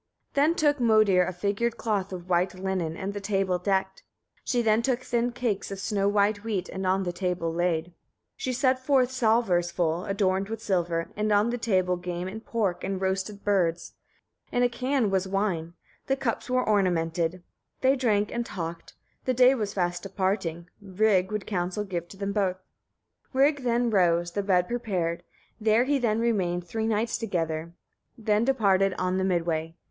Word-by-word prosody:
28. 280 - +2
Then 315 +3 +3
took 295 -3 +2
Modir 215 -6 +4
a - - -1
figured 205 +6 -1
cloth 205 -4 -1
of 180 -1 -7
white 180 +1 +1
linen, 185 -4 -2
and 195 +1 -4
the 205 - -5
table 195 -2 0
decked. 190 0 -1 0.4
She 245 -2 0
then 220 0 +3
took 255 +1 0
thin 240 -1 0
cakes 235 -5 -2
of 195 - -5
snow 200 0 0
white 205 0 +2
wheat, 205 -5 -2
and 190 0 -3
on 190 +1 +2
the 175 -1 -3
table 175 -3 -2
laid. 170 -1 +1
29. 175 +1 -20 0.4
She 255 - -3
set 255 +1 +2
forth 260 -2 +3
salvers 220 -8 +2
full, 170 0 -1
adorned 195 0 0
with 225 0 -4
silver, 175 -6 -1
on 210 +2 +2
the 245 - -2
table 185 -5 +1
game 175 0 -4
and 220 +4 -7
pork, 200 -6 -1
and 190 0 -2
roasted 190 +2 -2
birds. 175 -4 0 0.6
In 245 - +2
a 245 - +4
can 250 -2 0
was 190 0 +1
wine; 190 -4 -1 0.3
the 270 - +2
cups 260 -2 -3
were 255 0 +1
ornamented. 175 -3 +1 0.4
They 265 +1 +4
drank 210 -6 +1
and 235 - -1
talked; 170 -6 -6 0.3
the 255 - +1
day 255 +2 +6
was 210 -6 -3
fast 175 -2 -1
departing, 185 -3 -2
Rig 195 -1 +1
would 210 -2 -3
counsel 185 +1 -2
give 175 -4 -4
to 195 - -13
them 200 0 -3
both. 190 -3 0 0.8
30. - - -5
Rig 285 +1 +4
then 240 -1 +1
rose, 175 -3 +2
the 205 - -1
bed 180 -3 +2
prepared; 185 -8 -2 0.4
there 220 +2 +3
he 280 +1 +1
then 225 -3 +1
remained 185 -7 0
three 220 +4 -2
nights 225 +1 0
together, 165 -6 -2 0.4
then 215 -1 +1
departed 195 -7 +2
on 185 +1 0
the - - 0
mid 175 -3 +1
way. 165 -1 -2
195 Hz, 185 wpm, -27 LUFS, 180-225 Hz, 0.8 s, day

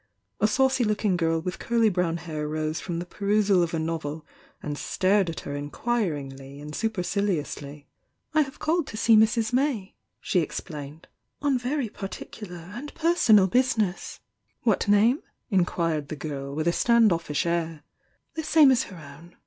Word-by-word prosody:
A 215 - +4
saucy 265 +3 +2
looking 210 -3 +1
girl 165 -1 +1
with 180 +2 -5
curly 230 -1 +2
brown 180 -3 0
hair 155 -3 -4
rose 155 +1 -2
from 175 -3 -4
the 175 - -4
perusal 200 0 +2
of 170 -1 0
a 165 - -1
novel 160 -1 -3 0.4
and 145 -1 -3
stared 190 +4 +1
at 165 - -5
her 145 - -5
inquiringly 145 - -3
and 150 +1 -8
superciliously. 180 -9 -2 0.5
"I 310 - +5
have 270 -2 -4
called 325 0 0
to 215 - -7
see 225 0 +5
Mrs. 220 +2 +3
May" 250 -7 0
— - - -53
she 185 - +1
explained 150 -1 -6 0.3
"on 280 -1 +1
very 255 +1 -1
particular 195 -3 -8
and 275 +7 -7
personal 315 - +5
business." 220 -3 0 0.4
"What 220 -5 +2
name?" 215 +7 +4 0.3
inquired 170 -5 +1
the 155 - -5
girl, 140 -2 -5
with 155 +2 -1
a 170 - +3
stand 235 -3 +4
offish 165 0 -2
air. 165 -3 -2 0.5
"The 320 - -3
same 310 -2 +6
as 255 -1 +2
her 185 - -11
own. 150 +3 -13
185 Hz, 165 wpm, -26 LUFS, 155-225 Hz, 0.5 s, same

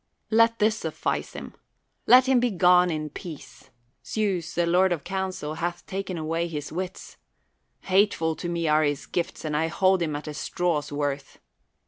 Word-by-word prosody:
Let 230 +1 +4
this 215 0 +2
suffice 160 -6 -3
him. - - -8 0.5
Let 255 +1 +7
him 260 -2 +4
begone 180 -6 +4
in 155 -2 -3
peace; 160 -1 -10 0.3
Zeus, 185 -6 -2
the 175 - +2
lord 180 +2 +3
of 165 -5 -1
counsel, 190 -5 -3
hath 170 +2 -4
taken 190 -2 -4
away 165 +2 -1
his 150 -3 -5
wits. 185 +3 -6 0.6
Hateful 185 -4 +2
to 175 - -4
me 170 -1 -1
are 155 0 +4
his 145 -2 -1
gifts, 170 -2 -3
and 150 -1 -2
I 160 +2 +1
hold 185 +2 +2
him 155 -3 -1
at 150 +1 -6
a 150 - -4
straw's 160 -2 -1
worth. 145 -1 -3
170 Hz, 165 wpm, -26 LUFS, 155-190 Hz, 0.6 s, Let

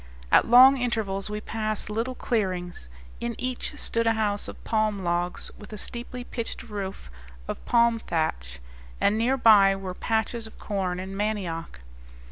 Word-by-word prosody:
At - - +5
long 260 +3 +9
intervals 220 -6 -1
we 210 0 -4
passed 215 -1 -2
little 230 +5 -2
clearings. 180 - -2 0.3
In 235 -1 -3
each 255 +4 -3
stood 230 -4 0
a 225 - +4
house 210 -2 0
of - - -10
palm 215 -3 0
logs, 175 0 -1
with 210 - -12
a - - -5
steeply 245 +4 -6
pitched 235 +1 -5
roof 200 - -6 0.4
of - - -5
palm 235 -1 +3
thatch; 65 - -2 0.4
and 205 - +3
near 240 +5 +2
by 205 -5 +6
were 190 -1 -5
patches 225 +3 -1
of 220 - -15
corn 185 -3 -2
and 190 +1 -6
mandioc. 190 - -3
215 Hz, 155 wpm, -26 LUFS, 190-235 Hz, 0.4 s, long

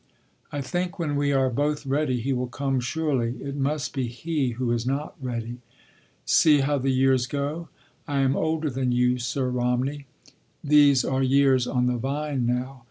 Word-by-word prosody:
I 145 - -3
think 175 +7 -3
when 155 -5 -2
we 145 0 +1
are 135 -2 +2
both 145 +3 -1
ready 135 -3 0
he 135 +3 -1
will 125 0 -2
come 135 +1 -1
surely—it 135 -1 -2
must 145 +1 -2
be 130 -3 -1
he 135 +3 -2
who 125 -2 -1
is 120 -1 0
not 140 +4 -3
ready.... 120 -1 -4 0.7
See 150 -3 +5
how 145 +1 +1
the 135 +1 -1
years 130 -1 +2
go. 145 +5 -3 0.4
I 140 -2 0
am 135 0 +2
older 160 -1 -1
than 130 0 -1
you, 125 +1 +2
Sir 125 +2 -2
Romney. 125 +3 -1 0.6
These 145 -3 +5
are 130 0 0
years 135 -1 +3
on 125 -1 +1
the 125 0 +1
vine 135 0 -2
now. 125 +2 -2
135 Hz, 170 wpm, -25 LUFS, 125-145 Hz, 0.7 s, See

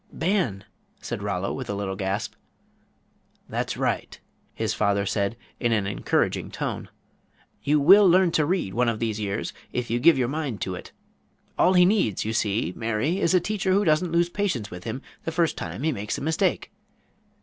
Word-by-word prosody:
"Ban," 165 - 0 0.4
said - - -5
Rollo, 100 -2 -2
with 130 - -6
a 100 - -1
little 100 -1 -3
gasp. 95 +2 -2 1.1
"That's - - -3
right," - - -2 0.4
his - - -1
father 100 -1 +1
said, 100 +2 -1 0.2
in 120 - +1
an 105 -3 +1
encouraging 95 -1 0
tone; - - -4 0.7
"you 150 +1 +2
will 190 +7 +7
learn 180 0 +5
to 155 -2 +2
read 175 - -1
one 120 +2 +2
of 115 - -1
these 110 -1 -2
years 105 0 -3 0.2
if 125 -2 -3
you 120 - +1
give 160 +5 +6
your 125 -2 +1
mind 140 -5 -3
to 95 - -2
it. 90 - -8 0.6
All 185 - +4
he 180 -1 +6
needs, 185 - +1
you 110 - -1
see, 105 -5 0
Mary, 115 - -1
is 185 -1 +2
a - - +6
teacher 195 0 -1
who 200 +2 +3
doesn't 160 +2 +2
lose 170 +1 +2
patience 175 - -2
with 90 0 -9
him 115 +4 -4 0.2
the 165 - -3
first 165 0 +1
time 90 - -6
he 160 - +2
makes 105 -5 -3
a - - -6
mistake. 160 +2 0
120 Hz, 185 wpm, -25 LUFS, 100-170 Hz, 1.1 s, will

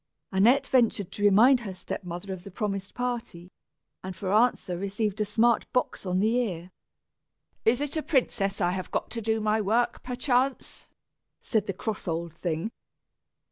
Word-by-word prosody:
Annette 240 +9 +4
ventured 230 -8 +2
to 205 - -6
remind 225 +6 +6
her 200 -6 -6
step 190 - -6
mother 180 +2 -5
of 180 -2 -9
the 200 - -9
promised 195 0 -4
party, 235 -8 -4 0.5
and, 185 0 -6
for 190 -1 -2
answer, 220 -5 +2
received 200 +3 -2
a - - +2
smart 225 +2 +2
box 250 -5 -1
on 180 0 +1
the 220 +4 +2
ear. 180 -6 -3 0.9
"Is 240 +3 +4
it 290 +1 -3
a 315 - 0
princess 225 -10 0
I 175 - +2
have 185 0 -4
got - - -3
to 230 - -4
do 220 +1 0
my 215 0 +1
work, 235 +4 +1
perchance?" 255 +1 -1 0.5
said 215 -3 -1
the 195 - -1
cross 210 +2 -4
old 165 -1 -2
thing. 170 +4 -3
210 Hz, 170 wpm, -27 LUFS, 190-240 Hz, 0.9 s, remind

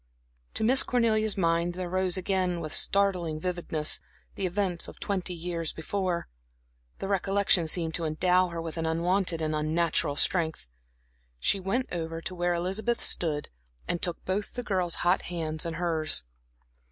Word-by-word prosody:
To - - 0
Miss 255 +4 +8
Cornelia's 220 -4 +1
mind 170 -1 +1
there 180 0 -4
rose 185 0 +1
again, 185 -2 0
with 155 -2 -5
startling 180 -6 +2
vividness, 170 -3 -1 0.3
the 190 - -2
events 180 -2 0
of - - -11
twenty 185 -3 -2
years 165 -1 -3
before. 180 +1 -2 0.7
The - - -5
recollection 195 -3 +2
seemed 165 0 +1
to 165 - -2
endow 180 +4 +2
her 170 -1 -6
with 165 0 -5
an 165 0 -1
unwonted 170 +1 +1
and 155 0 -1
unnatural 155 -1 +1
strength. 160 - +2 0.7
She 195 - +2
went 195 +8 -1
over 165 -1 -3
to 175 - -5
where 175 0 0
Elizabeth 195 +7 -1
stood 150 -4 +1 0.4
and 175 - -1
took 175 -2 -2
both 200 +2 -2
the 245 - -3
girl's 185 -5 0
hot 180 +2 +3
hands 160 -2 -3
in 165 - -4
hers. 160 - +2
175 Hz, 155 wpm, -28 LUFS, 165-190 Hz, 0.7 s, Miss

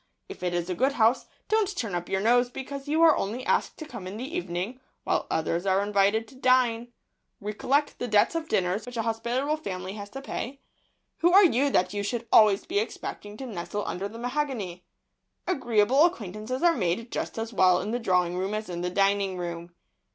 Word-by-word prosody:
If - - -10
it 180 -1 -1
is 175 -1 -1
a 185 - -1
good 265 +9 +1
house, 230 0 +2 0.2
don't 415 -3 +1
turn 225 -6 -3
up 175 0 -3
your 190 - 0
nose 245 +3 +3
because 275 +2 -7
you 315 +3 +2
are 320 -2 +7
only 235 +6 -3
asked - - 0
to 315 - -7
come 235 -10 -8
in 195 +3 -6
the 270 +8 -6
evening, 220 - -3 0.2
while - - 0
others 170 +3 -1
are 190 +1 +3
invited 205 +2 +2
to - - -16
dine. 245 -2 +2 0.5
Recollect 260 +8 -1
the 245 - -2
debts 210 +3 +3
of 330 -1 -3
dinners 190 +5 0
which 245 -1 -7
an 225 - 0
hospitable 235 +6 -1
family 185 -9 -5
has 205 -1 -8
to 270 - -7
pay; 275 0 -5 0.6
who 345 +1 +4
are 395 +2 +8
you 280 -3 +3
that 185 -7 +1
you 205 - -2
should 235 +3 -3
always 210 -2 +6
be 390 +4 0
expecting 210 - -5
to 265 - -6
nestle 205 -2 -4
under 190 +3 -3
the 220 +3 -10
mahogany? 240 -8 -3 0.6
Agreeable 255 - +3
acquaintances 220 - -3
are 345 -1 +6
made 210 +3 -1
just - - -4
as 225 +1 -4
well 185 -2 +4
in 205 +4 -3
the 240 - -1
drawing 180 -5 +1
room 190 +3 -2
as 215 -1 -4
in 175 -1 -4
the 180 - -1
dining 195 0 +1
room. 170 -1 -5
220 Hz, 205 wpm, -27 LUFS, 190-260 Hz, 0.6 s, are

